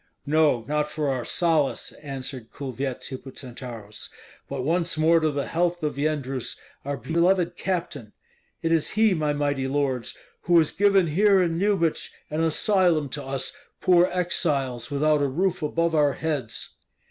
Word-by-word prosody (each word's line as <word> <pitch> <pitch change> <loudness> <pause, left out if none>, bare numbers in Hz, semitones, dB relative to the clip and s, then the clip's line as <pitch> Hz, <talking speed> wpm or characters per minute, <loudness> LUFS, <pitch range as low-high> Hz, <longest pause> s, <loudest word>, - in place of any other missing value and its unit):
"No, 145 -6 +2
not 150 +1 0
for 150 -2 -2
our 130 -2 -1
solace," 160 -4 +1
answered 135 -4 -6
Kulvyets 135 -1 -4
Hippocentaurus, 125 -5 -8 0.4
"but 135 -2 -3
once 165 +3 0
more 165 +2 +4
to 155 -1 +1
the 140 -2 -2
health 175 0 -1
of 150 -2 -2
Yendrus, 140 -4 -2 0.3
our 140 0 -3
beloved 170 - +1
captain. 165 - -3 0.5
It 165 - +1
is 165 -2 +2
he, 220 -2 +5
my 155 -3 0
mighty 145 -2 -1
lords, 135 -3 -1 0.3
who 175 -1 +5
has 160 -2 +4
given 200 -2 +4
here 195 +5 +4
in 170 -2 +1
Lyubich 190 -5 +1 0.2
an 155 +2 0
asylum 165 -2 +2
to 145 +2 -5
us 135 0 -3 0.2
poor 180 0 +4
exiles 145 -9 -1
without 150 +1 +2
a 140 - +2
roof 180 +6 0
above 165 +2 0
our 145 -3 +3
heads." 145 -8 -3
150 Hz, 150 wpm, -25 LUFS, 135-170 Hz, 0.5 s, he